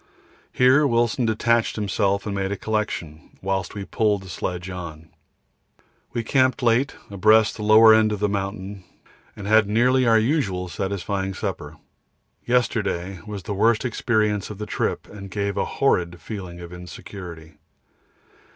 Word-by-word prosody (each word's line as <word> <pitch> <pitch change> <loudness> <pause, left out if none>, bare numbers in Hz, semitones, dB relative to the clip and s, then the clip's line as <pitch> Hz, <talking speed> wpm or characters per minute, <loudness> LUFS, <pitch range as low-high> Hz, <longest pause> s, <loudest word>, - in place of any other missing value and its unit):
Here 130 +4 +4
Wilson 120 -1 +1
detached 115 +1 +1
himself 100 -1 0
and 105 - -3
made 95 0 -2
a 100 - -2
collection, 95 -8 -4
whilst 95 -2 -2
we 100 -1 -5
pulled 105 -3 0
the 95 - -11
sledge 90 +1 -4
on. 85 -4 -8 1.0
We 120 - -2
camped 130 +2 +2
late, 120 +4 +2 0.2
abreast 110 +3 +4
the - - -7
lower 110 +1 +7
end 110 0 +4
of 105 - -2
the 105 - +1
mountain, 100 -1 -4 0.5
and 100 - -8
had 110 0 +4
nearly 125 +3 +3
our 115 -1 +6
usual 110 - 0
satisfying 95 0 -3
supper. 80 -7 -5 0.7
Yesterday 100 -7 0
was 105 -3 -6
the 105 - -4
worst 115 +4 +2
experience 110 -4 0
of 105 - -7
the 105 - -5
trip - - -2
and 100 -1 -10
gave 100 +1 -2
a - - 0
horrid 90 -10 0
feeling 90 -5 -7
of 85 0 -9
insecurity. 90 -2 -10
100 Hz, 150 wpm, -23 LUFS, 95-110 Hz, 1.0 s, lower